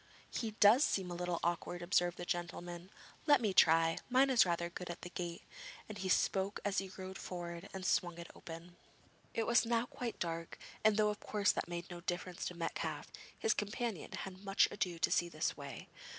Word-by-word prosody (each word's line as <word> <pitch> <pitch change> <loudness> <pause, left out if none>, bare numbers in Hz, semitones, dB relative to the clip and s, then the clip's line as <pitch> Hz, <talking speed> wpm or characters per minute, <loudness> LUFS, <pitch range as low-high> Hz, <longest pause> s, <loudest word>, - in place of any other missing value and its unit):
'He 225 - -2
does 225 +7 +8
seem 185 -9 0
a - - -2
little 175 -1 -2
awkward,' 175 +1 -1
observed 175 0 +2
the 175 - -5
gentleman. 175 0 -4 0.4
'Let 290 -1 +7
me 215 -5 0
try: 165 -1 +5
mine 265 +2 +5
is 235 -7 +6
rather 170 0 0
good 175 +1 -7
at 175 - -6
a - - -5
gate,' 175 -1 -5 0.4
and 215 - -7
as - - -4
he 190 - -1
spoke 195 +2 +2 0.2
he 195 0 0
rode 190 0 -6
forward 175 +1 -6
and 190 -1 -6
swung 175 -2 +1
it 170 0 -8
open. 170 0 -10 0.6
It 225 - +1
was 235 +1 +5
now 230 0 +1
quite 245 -1 -5
dark, 165 -1 -3 0.3
and 215 -1 +5
though 210 -1 +4
of 210 - -3
course 205 -1 +2
that - - -3
made 175 +1 -5
no 175 0 -7
difference 175 0 -3
to 180 - -4
Metcalfe, 165 -1 -3 0.3
his 445 - +2
companion 210 -2 -3
had 190 0 -6
much 195 0 +4
ado 180 -4 -1
to 165 - +1
see 175 - +2
his 155 -1 -1
way. 140 -3 -8
180 Hz, 200 wpm, -36 LUFS, 170-205 Hz, 0.6 s, does